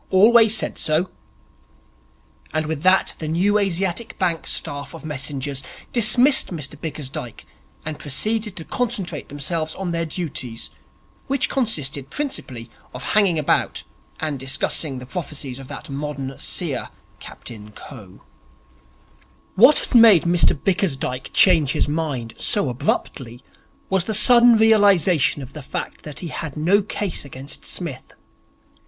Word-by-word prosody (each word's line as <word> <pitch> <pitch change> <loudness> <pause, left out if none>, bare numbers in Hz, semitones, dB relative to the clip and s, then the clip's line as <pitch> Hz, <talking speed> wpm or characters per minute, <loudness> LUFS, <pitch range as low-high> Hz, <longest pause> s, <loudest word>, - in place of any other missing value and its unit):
'Always 220 +3 +6
said - - -3
so.' 160 +4 0 1.4
And 155 0 -1
with 155 -1 -4
that 185 +2 +3
the 155 - -4
New 190 +6 +2
Asiatic 190 +2 -2
Bank 175 -3 -1
staff 145 +4 -3
of 165 - -11
messengers 140 -2 -4 0.3
dismissed 250 +4 +5
Mr 150 -6 -5
Bickersdyke 140 -6 -7 0.4
and 155 -1 -5
proceeded 210 - -1
to 165 - -7
concentrate 200 - -3
themselves 155 +3 -3
on 190 -2 -4
their 165 -1 -2
duties, 140 -9 -5 0.6
which 275 -1 0
consisted 145 - -2
principally 130 - -5 0.2
of 125 - -7
hanging 200 -6 +3
about 150 - 0 0.4
and 150 -4 -3
discussing 135 +1 -1
the 125 - -8
prophecies 140 -4 -6
of 135 - -10
that 140 -1 -9
modern 140 -1 -5
seer, - - -2 0.3
Captain 105 -3 -11
Coe. 105 -3 -13 1.3
What 250 +9 +6
had - - -1
made 225 -8 +7
Mr 170 -4 +2
Bickersdyke 140 -9 -1
change 160 -7 +4
his - - 0
mind 145 -7 -3
so 200 -10 +2
abruptly 120 0 -3 0.4
was 190 -2 +1
the 220 - 0
sudden 235 +2 +7
realization 200 -10 +4
of 130 - -12
the 150 - -8
fact 135 - -6
that 150 -2 -8
he 175 - -5
had 155 -2 -6
no 180 +7 +3
case 205 -1 -2
against 135 0 -9
Psmith. 160 -8 -5
160 Hz, 135 wpm, -21 LUFS, 135-195 Hz, 1.4 s, made